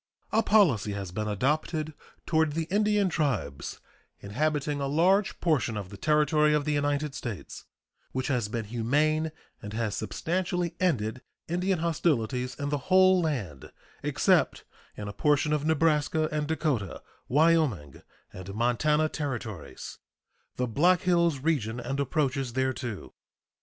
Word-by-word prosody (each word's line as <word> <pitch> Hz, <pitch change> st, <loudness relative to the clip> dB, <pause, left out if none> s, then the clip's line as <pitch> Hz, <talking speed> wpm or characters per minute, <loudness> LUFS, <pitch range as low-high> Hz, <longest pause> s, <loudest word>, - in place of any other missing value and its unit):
A 220 Hz, -, +3 dB
policy 145 Hz, -, +3 dB
has 100 Hz, -3 st, -5 dB
been 105 Hz, +3 st, -3 dB
adopted 150 Hz, -, -1 dB, 0.3 s
toward 160 Hz, -2 st, +2 dB
the 165 Hz, +1 st, -1 dB
Indian 210 Hz, -1 st, +2 dB
tribes 125 Hz, -, -2 dB, 0.4 s
inhabiting 145 Hz, +6 st, -1 dB
a 140 Hz, -, -1 dB
large 185 Hz, +8 st, +2 dB
portion 140 Hz, -9 st, +1 dB
of 100 Hz, -3 st, -6 dB
the 100 Hz, -, -9 dB
territory 150 Hz, +4 st, +3 dB
of 145 Hz, -1 st, 0 dB
the 150 Hz, -, 0 dB
United 145 Hz, 0 st, 0 dB
States 115 Hz, -8 st, -7 dB, 0.5 s
which 130 Hz, 0 st, -2 dB
has 125 Hz, -6 st, 0 dB
been 115 Hz, 0 st, -4 dB
humane 150 Hz, +8 st, +1 dB, 0.3 s
and 105 Hz, 0 st, -7 dB
has 110 Hz, -2 st, -1 dB
substantially 175 Hz, +7 st, -2 dB
ended 130 Hz, -9 st, 0 dB, 0.3 s
Indian 180 Hz, +3 st, 0 dB
hostilities 130 Hz, -7 st, 0 dB
in 145 Hz, +2 st, -3 dB
the 145 Hz, 0 st, -1 dB
whole 185 Hz, 0 st, +6 dB
land 110 Hz, -, -3 dB, 0.3 s
except -, -, +2 dB, 0.3 s
in 105 Hz, -, -5 dB
a 100 Hz, -, -5 dB
portion 150 Hz, +3 st, +2 dB
of 150 Hz, 0 st, 0 dB
Nebraska, 155 Hz, 0 st, +2 dB
and 150 Hz, -1 st, -1 dB
Dakota, 145 Hz, -, -2 dB, 0.2 s
Wyoming, 145 Hz, -, +2 dB, 0.3 s
and 95 Hz, +2 st, -8 dB
Montana 150 Hz, +7 st, +2 dB
Territories 120 Hz, -, -6 dB, 0.6 s
the 125 Hz, -, 0 dB
Black 170 Hz, +10 st, +3 dB
Hills 170 Hz, -4 st, +2 dB
region 125 Hz, -7 st, 0 dB
and 135 Hz, +3 st, -3 dB
approaches 135 Hz, -2 st, -1 dB
thereto. 130 Hz, -4 st, -3 dB
145 Hz, 135 wpm, -28 LUFS, 115-160 Hz, 0.6 s, whole